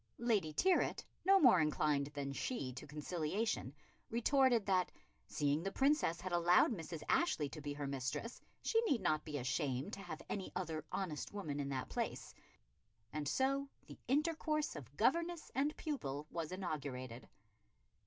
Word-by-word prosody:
Lady 215 Hz, -9 st, +1 dB
Tyrwhitt, 365 Hz, -, +2 dB, 0.2 s
no 390 Hz, +1 st, +7 dB
more 245 Hz, -, +7 dB
inclined 150 Hz, -2 st, +2 dB
than 140 Hz, -1 st, -3 dB
she 135 Hz, -, -2 dB
to 130 Hz, -, -8 dB
conciliation, 155 Hz, -, -2 dB, 0.4 s
retorted 240 Hz, -1 st, +3 dB
that, 185 Hz, -2 st, +2 dB, 0.4 s
seeing 145 Hz, +1 st, +1 dB
the 195 Hz, +3 st, -2 dB
Princess 270 Hz, -, +2 dB
had 185 Hz, +1 st, -5 dB
allowed 175 Hz, +4 st, +5 dB
Mrs. 165 Hz, -5 st, -5 dB
Ashley 250 Hz, -, +2 dB
to 155 Hz, -, -8 dB
be 145 Hz, 0 st, -4 dB
her 145 Hz, 0 st, -4 dB
mistress, 135 Hz, -, -3 dB, 0.2 s
she 455 Hz, -, +3 dB
need 270 Hz, -7 st, +2 dB
not 155 Hz, 0 st, +1 dB
be 150 Hz, -2 st, -4 dB
ashamed 130 Hz, -, -1 dB
to -, -, -5 dB
have -, -, -7 dB
any 195 Hz, -2 st, -3 dB
other 165 Hz, -4 st, -2 dB
honest 170 Hz, -6 st, -3 dB
woman 155 Hz, -9 st, -3 dB
in 140 Hz, -1 st, -2 dB
that 130 Hz, -2 st, -2 dB
place, -, -, -3 dB, 0.8 s
and 150 Hz, -1 st, -2 dB
so 275 Hz, -, +1 dB, 0.2 s
the -, -, -11 dB
intercourse 305 Hz, -, +1 dB
of 140 Hz, -2 st, -10 dB
governess 335 Hz, +8 st, +1 dB
and 285 Hz, +3 st, 0 dB
pupil 150 Hz, -, -3 dB
was 165 Hz, -1 st, -3 dB
inaugurated. 135 Hz, -9 st, -4 dB
175 Hz, 155 wpm, -37 LUFS, -, 0.8 s, no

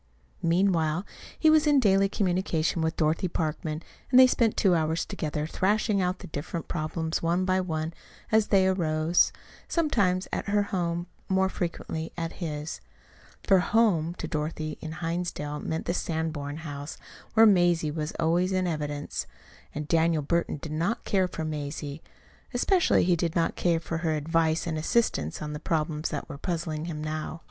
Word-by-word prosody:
Meanwhile 170 Hz, -1 st, +2 dB, 0.3 s
he 315 Hz, -, +5 dB
was 310 Hz, 0 st, +4 dB
in 290 Hz, -2 st, +5 dB
daily 195 Hz, -4 st, +4 dB
communication 180 Hz, -4 st, 0 dB
with 160 Hz, 0 st, -1 dB
Dorothy 160 Hz, +3 st, +1 dB
Parkman, 155 Hz, -1 st, -3 dB, 0.3 s
and 255 Hz, -, +7 dB
the -, -, +11 dB
two -, -, +8 dB
spent 225 Hz, -4 st, +1 dB
hours 165 Hz, -3 st, +2 dB
together, 150 Hz, -1 st, -3 dB
thrashing 200 Hz, +4 st, +1 dB
out 180 Hz, 0 st, 0 dB
the -, -, -10 dB
different 160 Hz, +3 st, -5 dB
problems 160 Hz, 0 st, -2 dB
one 175 Hz, +2 st, +1 dB
by 185 Hz, 0 st, +2 dB
one 160 Hz, -2 st, -3 dB, 0.4 s
as 220 Hz, -1 st, +4 dB
they 195 Hz, -2 st, +4 dB
arose, 165 Hz, -2 st, +2 dB, 0.4 s
sometimes 200 Hz, -, +1 dB
at -, -, -2 dB
her 205 Hz, 0 st, +2 dB
home, 175 Hz, -3 st, -2 dB, 0.2 s
more 190 Hz, 0 st, +3 dB
frequently 165 Hz, -3 st, -4 dB
at 165 Hz, -1 st, -2 dB
his; 150 Hz, -2 st, -4 dB, 0.6 s
for 195 Hz, -3 st, +5 dB
"home" 180 Hz, -5 st, +2 dB
to -, -, -5 dB
Dorothy 155 Hz, 0 st, -3 dB
in 160 Hz, -, -5 dB
Hinsdale 165 Hz, -3 st, -3 dB
meant 160 Hz, 0 st, -3 dB
the 175 Hz, -, 0 dB
Sanborn 160 Hz, -4 st, -2 dB
house, 145 Hz, -2 st, -6 dB, 0.4 s
where 225 Hz, 0 st, +8 dB
Mazie 175 Hz, -6 st, +4 dB
was 155 Hz, +1 st, -3 dB
always 170 Hz, +3 st, +2 dB
in 185 Hz, -1 st, +1 dB
evidence 150 Hz, -3 st, -3 dB, 0.5 s
and 150 Hz, 0 st, -4 dB
Daniel 165 Hz, -1 st, +2 dB
Burton 170 Hz, +2 st, 0 dB
did 150 Hz, +2 st, -7 dB
not 175 Hz, +10 st, -1 dB
care 190 Hz, -3 st, +2 dB
for 160 Hz, -3 st, -5 dB
Mazie. 145 Hz, 0 st, -4 dB, 0.5 s
Especially 355 Hz, +8 st, +3 dB
he 180 Hz, 0 st, +3 dB
did 165 Hz, -1 st, -1 dB
not 165 Hz, -, +1 dB
care 170 Hz, -2 st, +2 dB
for 165 Hz, 0 st, -4 dB
her 160 Hz, -2 st, 0 dB
advice 160 Hz, +1 st, +1 dB
and 160 Hz, -2 st, -2 dB
assistance 155 Hz, -, 0 dB
on 150 Hz, 0 st, -4 dB
the 150 Hz, -, -5 dB
problems 155 Hz, -1 st, -1 dB
that -, -, -4 dB
were 140 Hz, -3 st, -8 dB
puzzling 160 Hz, -3 st, -3 dB
him 155 Hz, -3 st, -5 dB
now. 155 Hz, +1 st, -4 dB
165 Hz, 165 wpm, -27 LUFS, 155-185 Hz, 0.6 s, the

